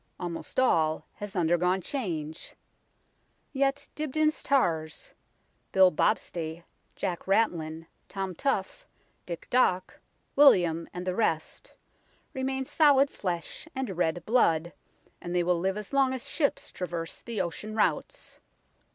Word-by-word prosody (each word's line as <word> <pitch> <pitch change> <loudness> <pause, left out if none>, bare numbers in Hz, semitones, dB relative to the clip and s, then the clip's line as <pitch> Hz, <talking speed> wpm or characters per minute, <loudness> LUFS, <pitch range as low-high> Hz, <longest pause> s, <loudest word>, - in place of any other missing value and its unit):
Almost 175 +6 -4
all 160 -11 +2
has 205 -1 -7
under 175 -1 +2
gone 180 +2 +2
change. 165 - -4 1.0
Yet 275 +1 0
Dibdin's 310 +1 0
tars 165 - 0 0.6
Bill 190 -1 +6
Bobstay, 165 +1 -1 0.3
Jack 175 0 -3
Ratlin, 165 -6 +1 0.2
Tom 195 -2 -3
Tough, 195 - -2 0.4
Dick 170 -2 -6
Dock, 185 -7 +2 0.4
William, 175 - +5
and 180 0 -6
the 185 - 0
rest 200 - -2 0.6
remain 265 -1 -2
solid 280 -1 +4
flesh 180 - -4
and 260 -8 -3
red 170 0 0
blood, 170 -8 +2 0.5
and 175 0 -4
they 175 - +3
will 175 0 +2
live 190 +3 0
as 210 +4 -7
long 270 -1 +3
as 260 - -5
ships 285 -4 0
traverse 170 -2 -5
the 230 -2 -5
ocean 190 +6 -3
routes. - - -1
185 Hz, 125 wpm, -28 LUFS, 170-260 Hz, 1.0 s, Bill